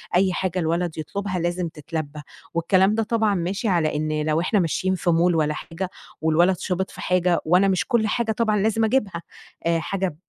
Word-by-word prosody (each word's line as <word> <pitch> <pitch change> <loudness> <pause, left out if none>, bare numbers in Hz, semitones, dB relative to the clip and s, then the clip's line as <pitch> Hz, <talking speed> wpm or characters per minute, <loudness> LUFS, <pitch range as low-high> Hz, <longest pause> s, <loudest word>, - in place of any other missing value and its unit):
أي 185 0 +3
حاجة 185 0 -1
الولد 170 0 -1
يطلبها 185 +4 -3
لازم 175 +1 -1
تتلبى." 155 0 -5 0.5
والكلام 185 +4 +3
ده 225 - +1
طبعًا 220 -2 +1
ماشي 190 +6 -2
على 170 -6 +1
إن 155 0 -1
لو 155 0 +1
إحنا 205 +4 +1
ماشيين 185 +2 0
في 175 - -1
mall - - +4 0.2
والّا 150 -1 +1
حاجة، 170 +4 -5 0.3
والولد 170 +4 +3
شبط 190 +1 -2
في - - -10
حاجة، 180 -1 +2
وأنا 180 +5 +4
مش 190 0 +1
كل 235 -4 +2
حاجة 225 +1 0
طبعًا 215 -1 +1
لازم 220 +2 +2
أجيبها، 210 -7 0 0.4
آآ، 170 0 +2
حاجة 190 0 -2
180 Hz, 185 wpm, -23 LUFS, 165-200 Hz, 0.5 s, mall